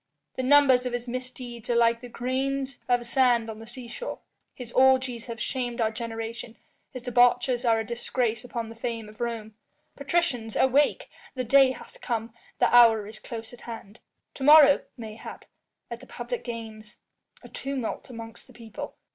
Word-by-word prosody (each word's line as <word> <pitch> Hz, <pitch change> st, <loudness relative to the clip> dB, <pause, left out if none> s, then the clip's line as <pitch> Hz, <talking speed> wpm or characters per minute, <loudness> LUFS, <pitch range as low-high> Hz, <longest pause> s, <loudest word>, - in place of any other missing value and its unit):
The -, -, -2 dB
numbers 260 Hz, -2 st, +5 dB
of 245 Hz, -, -4 dB
his 245 Hz, 0 st, -3 dB
misdeeds 250 Hz, -1 st, -7 dB
are 240 Hz, -, +2 dB
like 230 Hz, 0 st, +3 dB
the 245 Hz, -, -9 dB
grains 265 Hz, +2 st, -2 dB
of 245 Hz, -1 st, +2 dB
sand 240 Hz, -2 st, +2 dB
on 215 Hz, -, -10 dB
the 225 Hz, -, -11 dB
seashore, 255 Hz, -, -7 dB, 0.4 s
his 245 Hz, -2 st, -9 dB
orgies 255 Hz, -2 st, +3 dB
have 230 Hz, -2 st, -6 dB
shamed 245 Hz, -1 st, -3 dB
our 220 Hz, -1 st, +2 dB
generation, 225 Hz, 0 st, -6 dB, 0.3 s
his 255 Hz, -2 st, -9 dB
debauches 245 Hz, 0 st, +3 dB
are 225 Hz, -1 st, +4 dB
a 220 Hz, -, -3 dB
disgrace 235 Hz, 0 st, -2 dB
upon 235 Hz, -2 st, -5 dB
the 225 Hz, -, -10 dB
fame 230 Hz, -2 st, -4 dB
of 215 Hz, +2 st, -14 dB
Rome. 225 Hz, -2 st, -4 dB, 0.4 s
Patricians 275 Hz, -7 st, -1 dB
awake! 275 Hz, +3 st, +3 dB, 0.3 s
The 255 Hz, -, -2 dB
day 265 Hz, +2 st, +5 dB
hath -, -, -14 dB
come, 225 Hz, -1 st, -3 dB, 0.2 s
the -, -, +3 dB
hour 225 Hz, -3 st, +7 dB
is 215 Hz, +1 st, -10 dB
close 230 Hz, 0 st, -7 dB
at 245 Hz, -, -13 dB
hand. 225 Hz, -2 st, -9 dB, 0.3 s
To 270 Hz, -, -7 dB
morrow, 295 Hz, -1 st, +8 dB, 0.2 s
mayhap, 220 Hz, -2 st, -9 dB, 0.5 s
at -, -, -5 dB
the -, -, -14 dB
public -, -, -5 dB
games... 220 Hz, -3 st, -8 dB, 0.5 s
a -, -, -10 dB
tumult 270 Hz, -4 st, -4 dB
amongst 230 Hz, 0 st, -10 dB
the 255 Hz, -, -17 dB
people 225 Hz, -2 st, -8 dB
240 Hz, 170 wpm, -26 LUFS, 225-255 Hz, 0.5 s, morrow